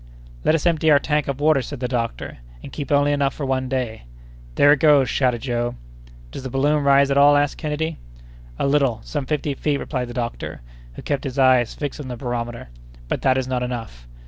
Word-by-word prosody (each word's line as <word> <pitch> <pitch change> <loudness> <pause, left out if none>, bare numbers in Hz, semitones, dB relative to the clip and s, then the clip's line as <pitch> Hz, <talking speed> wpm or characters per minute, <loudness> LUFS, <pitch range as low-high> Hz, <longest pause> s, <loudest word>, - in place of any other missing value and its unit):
"Let 160 - +3
us 160 - -2
empty 160 -2 +2
our 145 - +7
tank 150 +1 0
of 140 -1 -3
water," 150 -2 +3
said 140 +2 -7
the 125 - -2
doctor, 120 - -4 0.2
"and - - -9
keep 145 +1 -5
only 145 0 +3
enough 140 -2 0
for 145 - -4
one 130 -1 -1
day." 125 - -3 0.5
"There 145 0 +6
it 145 - 0
goes," 145 -5 +4
shouted 125 -4 0
Joe. 120 -2 -2 0.6
"Does - - -7
the 130 - -6
balloon 145 +3 +1
rise 140 0 +4
at 140 - +3
all?" 145 +1 +6
asked 145 0 0
Kennedy. 155 +1 -3 0.6
"A - - -1
little—some 140 0 0
fifty 150 -1 -1
feet," 145 +1 -1
replied 130 -3 -3
the 120 - -9
doctor, 120 - -4 0.3
who - - -9
kept 140 -2 -2
his 135 -1 -5
eyes 130 -3 +3
fixed 145 -1 -5
on 145 - -6
the 125 -1 -6
barometer. 120 - -5 0.4
"But - - -2
that 130 -1 +3
is 130 -1 -1
not 130 -1 -1
enough." 115 - -6
135 Hz, 210 wpm, -22 LUFS, 125-145 Hz, 0.6 s, our